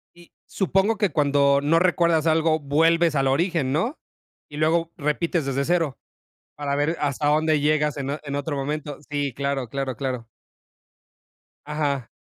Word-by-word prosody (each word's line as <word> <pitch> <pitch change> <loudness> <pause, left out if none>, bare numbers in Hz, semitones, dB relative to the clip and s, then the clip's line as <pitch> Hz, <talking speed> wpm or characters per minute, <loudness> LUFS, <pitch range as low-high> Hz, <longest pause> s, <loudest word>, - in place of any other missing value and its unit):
Y 175 0 -18
supongo 195 +3 +1
que 205 -6 +1
cuando 140 -1 +3
no 165 +3 +3
recuerdas 170 -3 +2
algo 160 0 +2
vuelves 165 +3 +2
al 135 -1 +2
origen, 155 -1 +1
¿no? 225 - -1 0.5
Y 145 - -9
luego 165 +2 +1
repites 155 +1 -1
desde 135 0 -1
0 165 -7 0 0.6
para 140 -1 -2
ver 150 +4 0
hasta 145 0 -1
dónde 155 0 +2
llegas 150 0 +1
en 140 0 -3
o 150 - -4
en 140 -1 -4
otro 145 +1 -3
momento. 145 +1 -4
Sí, 145 -3 -2
claro, 140 -2 -2
claro, 135 -1 -3
claro. 125 -3 -4 1.4
Ajá. 145 -5 -2
150 Hz, 150 wpm, -24 LUFS, 140-165 Hz, 1.4 s, cuando